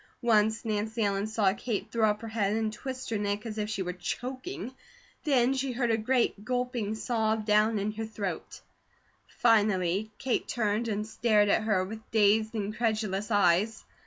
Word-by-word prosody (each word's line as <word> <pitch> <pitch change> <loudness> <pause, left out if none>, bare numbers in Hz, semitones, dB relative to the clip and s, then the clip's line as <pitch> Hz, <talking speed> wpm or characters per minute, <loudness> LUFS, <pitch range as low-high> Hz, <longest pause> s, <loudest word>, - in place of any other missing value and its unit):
Once 220 -1 +3
Nancy 220 +1 -1
Ellen 200 0 0
saw 215 -3 +2
Kate 215 0 -4
throw 220 -2 +3
up 210 +1 -1
her - - -5
head 210 -2 0
and 220 -1 -1
twist 260 +2 -6
her 220 - 0
neck 205 +1 -2
as 220 -1 -5
if 210 0 -2
she 200 -3 -2
were 180 0 -3
choking; 255 - -5 0.5
then 260 -3 +3
she 265 -1 -1
heard 240 -1 0
a - - +4
great 230 -2 +1
gulping 245 -3 -2
sob 220 -2 0
down 215 +1 +3
in 205 +1 -1
her 220 +1 -4
throat; 200 -6 -5 0.7
finally 210 -3 +2
Kate 260 -2 -1
turned 220 0 0
and 210 -1 -2
stared 215 -2 +2
at - - +3
her 200 -4 +2
with 215 +3 -7
dazed, 220 +1 +3
incredulous 215 -1 -1
eyes. 205 +1 +2
220 Hz, 170 wpm, -29 LUFS, 205-230 Hz, 0.7 s, a